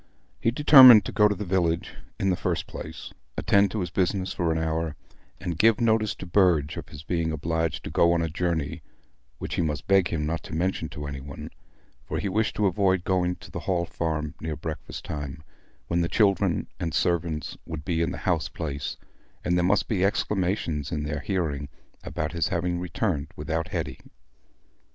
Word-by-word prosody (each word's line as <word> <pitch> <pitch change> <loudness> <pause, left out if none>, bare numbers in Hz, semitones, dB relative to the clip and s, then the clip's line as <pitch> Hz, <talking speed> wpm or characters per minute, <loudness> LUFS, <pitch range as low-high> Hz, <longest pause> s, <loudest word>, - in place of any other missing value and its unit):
He 115 - +2
determined 130 -5 +9
to - - -4
go 105 -1 +5
to 105 - 0
the 105 - -5
village, 85 -3 0 0.3
in 95 -1 +2
the - - +2
first - - -2
place, 80 +1 -8 0.2
attend 100 0 +4
to 105 +2 -3
his 90 -2 -3
business 95 +1 0
for 85 -2 0
an 80 - 0
hour, 80 -1 -1 0.4
and 85 -4 -4
give 110 -1 +5
notice 110 -2 +2
to - - -8
Burge 85 -5 +3
of - - -7
his 75 0 -10
being 85 -1 -1
obliged 80 0 -1
to - - -6
go 85 - +4
on 85 -1 +1
a - - 0
journey, 80 -1 -2 0.6
which - - -5
he - - 0
must 75 -1 -2
beg 95 -2 +4
him 75 -2 -2
not 80 +2 -2
to 80 - -7
mention 85 -2 -1
to 75 - -7
any 70 -1 -5
one; 70 0 -8 0.5
for - - -4
he 100 - -1
wished 110 +4 0
to 105 - +1
avoid 95 -1 +2
going 90 -1 +1
to - - -14
the - - -4
Hall 85 -2 +1
Farm 80 -3 -3
near 80 -1 -3
breakfast 80 +1 -6
time, 75 -1 -5 0.4
when 85 +1 0
the 85 - 0
children 100 -4 +2
and 80 -3 -2
servants 85 -3 0
would 80 -2 -6
be 85 -2 0
in 85 - +1
the - - -5
house 85 -4 +1
place, 70 -4 -4 0.5
and 90 - +2
there 90 - +2
must 95 +4 +2
be 95 -4 0
exclamations 90 -7 0
in 75 -3 -2
their 75 0 -3
hearing 75 -4 -2 0.3
about 80 0 -3
his 85 0 0
having 90 -2 -1
returned 90 -3 -1
without 80 0 -2
Hetty. - - -4
85 Hz, 195 wpm, -26 LUFS, 80-95 Hz, 0.6 s, determined